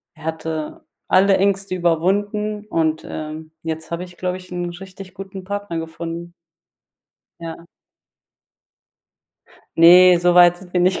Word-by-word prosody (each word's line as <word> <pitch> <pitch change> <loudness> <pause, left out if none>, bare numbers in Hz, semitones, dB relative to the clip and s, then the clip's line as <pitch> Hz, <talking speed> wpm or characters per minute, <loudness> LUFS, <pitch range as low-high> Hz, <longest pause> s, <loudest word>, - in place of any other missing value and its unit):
Er 160 - -16
hatte 160 -1 -5 0.2
alle 195 +1 +5
Ängste 195 -1 0
überwunden 205 +5 0
und, 160 -4 -1
ähm, 155 +1 -7
jetzt 160 0 -5
habe 170 +2 -3
ich, 175 0 -16
glaube 185 0 -2
ich, 185 0 -14
'n 175 -1 -3
richtig 190 -1 -11
guten 195 -1 -9
Partner 200 -3 -4
gefunden. 165 +1 -7 1.1
Ja. 165 0 -8 2.1
Ne, 175 +1 +8
so 175 0 +2
weit 175 0 +7
sind 180 -1 -15
wir 180 - +1
nicht 185 +1 +2
175 Hz, 130 wpm, -20 LUFS, 165-190 Hz, 2.1 s, Ne